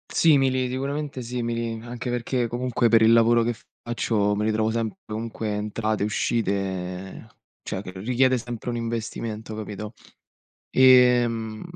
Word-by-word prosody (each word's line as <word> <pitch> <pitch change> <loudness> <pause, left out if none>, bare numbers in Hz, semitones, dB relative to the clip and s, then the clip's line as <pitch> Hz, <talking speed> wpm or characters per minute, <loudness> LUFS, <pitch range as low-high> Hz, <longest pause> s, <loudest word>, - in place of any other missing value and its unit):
Simili, 135 -5 +3
sicuramente 140 +2 -3
simili, 115 -1 -3
anche 120 +1 -6
perché 120 0 -1
comunque 120 0 0
per 115 -1 +5
il 110 +1 +6
lavoro 115 0 +5
che 120 0 -1 0.3
faccio 110 -3 0
mi 105 - -1
ritrovo 110 0 +1
sempre 115 - -2
comunque 110 0 -4
entrate 105 0 -2
e - - +2
uscite, 95 -3 -2 0.4
cioè 95 - -4
che 90 -2 -9
richiede 130 +3 +2
sempre 120 0 -6
un - - -3
investimento, 115 -1 -4
capito, 105 0 -6 0.8
ehm, 120 -4 +4
115 Hz, 135 wpm, -24 LUFS, 110-125 Hz, 0.8 s, il